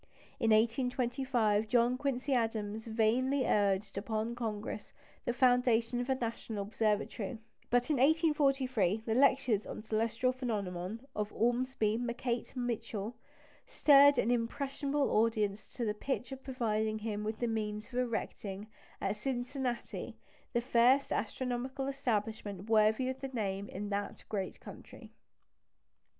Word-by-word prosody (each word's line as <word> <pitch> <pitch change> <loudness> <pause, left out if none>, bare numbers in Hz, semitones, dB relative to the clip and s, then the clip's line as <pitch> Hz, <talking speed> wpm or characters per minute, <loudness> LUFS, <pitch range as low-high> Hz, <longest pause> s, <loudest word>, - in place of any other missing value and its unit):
In 225 - +2
1825 235 -1 +2
John 240 +1 +3
Quincy 275 0 -1
Adams 220 -2 -1
vainly 245 +5 +2
urged 200 -1 +1
upon 220 +2 -2
Congress 215 -3 -5 0.3
the - - +1
foundation 245 -2 +3
of 245 - -5
a 265 - +3
National 230 -4 -3
Observatory; 215 +1 -1 0.3
but 245 +4 +2
in 295 - +2
1843 270 - +2
the 225 - 0
lectures 260 -4 +3
on - - -6
celestial 230 +3 +1
phenomena 205 -6 -3 0.2
of 210 0 -2
Ormsby 240 -2 +1
MacKnight 240 0 -3
Mitchel 230 -3 -3 0.5
stirred 285 -1 +6
an 240 - +2
impressionable 275 +4 0
audience 215 -2 +1
to 240 - -2
the 210 - 0
pitch 250 +4 -3
of 265 0 -7
providing 220 -4 -1
him 210 -1 -3
with 215 +1 -3
the 240 - -1
means 215 -2 -2
of 250 - -2
erecting 210 -4 -3 0.3
at - - -1
Cincinnati 250 +1 -3 0.3
the 235 - +1
first 250 +3 +4
astronomical 255 +4 -2
establishment 220 -7 -2
worthy 220 +4 +4
the 265 +1 -6
name 200 -6 -3
in 205 +2 -5
that 200 0 -3
great 195 -3 -3
country. - - -12
235 Hz, 125 wpm, -33 LUFS, 215-255 Hz, 0.5 s, stirred